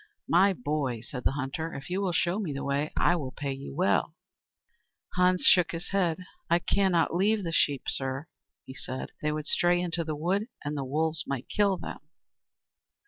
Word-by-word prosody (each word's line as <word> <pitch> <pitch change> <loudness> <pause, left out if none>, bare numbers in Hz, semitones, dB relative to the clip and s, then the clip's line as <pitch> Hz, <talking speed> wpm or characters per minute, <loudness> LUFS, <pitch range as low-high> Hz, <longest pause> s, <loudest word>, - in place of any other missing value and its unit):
"My 190 +4 +5
boy," 140 -6 -2
said 125 +1 -7
the - - +3
hunter, 145 +4 -3
"if 140 +5 -8
you 190 +2 0
will 190 -2 0
show 175 +3 +1
me 175 -9 -2
the 140 - -4
way, 140 +2 -1
I 175 - +4
will 140 -6 -4
pay 140 0 -4
you 135 - -8
well." - - +1 1.0
Hans 180 0 +3
shook 175 -2 +5
his 165 +2 -5
head. 180 -5 +1 0.3
"I 170 - +5
cannot 180 -2 +2
leave 205 +4 +2
the 165 - -2
sheep, 145 -4 +2
sir," 135 +2 -2 0.4
he 130 - -9
said. 130 0 -6
"They 150 - 0
would 150 0 -3
stray 175 +2 +3
into 175 -1 -1
the 155 -1 -3
wood, 185 +8 0 0.2
and 145 +1 -2
the 140 - -2
wolves 160 +4 -1
might 135 -2 -4
kill 200 -2 +2
them." - - -7
165 Hz, 190 wpm, -28 LUFS, 140-180 Hz, 1.0 s, My